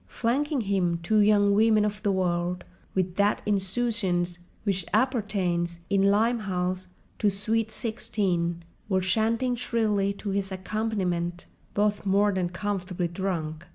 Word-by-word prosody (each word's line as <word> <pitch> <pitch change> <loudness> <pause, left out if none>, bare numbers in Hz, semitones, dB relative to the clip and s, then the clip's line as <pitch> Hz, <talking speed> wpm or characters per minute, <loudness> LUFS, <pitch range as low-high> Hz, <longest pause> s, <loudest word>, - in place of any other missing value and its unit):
Flanking 275 +4 0
him, 190 -5 +1
two 215 +5 +3
young 205 -1 +5
women 215 0 +4
of 210 -1 -3
the 205 -2 +1
world, 180 -1 0 0.3
with 185 -1 -1
that 205 +1 +2
insouciance 195 -3 0 0.2
which 195 -3 0
appertains—in 195 -6 0
Limehouse—to 195 -3 0
sweet 220 +3 0
sixteen, 195 -7 -1 0.3
were 190 -1 +2
chanting 225 +6 +1
shrilly 215 -5 +1
to 200 0 -5
his 195 0 -1
accompaniment: 185 -3 -2 0.3
both 205 0 +1
more 200 +1 +3
than 185 -2 -1
comfortably 180 -1 -2
drunk. 170 -3 -3
200 Hz, 120 wpm, -27 LUFS, 180-215 Hz, 0.3 s, young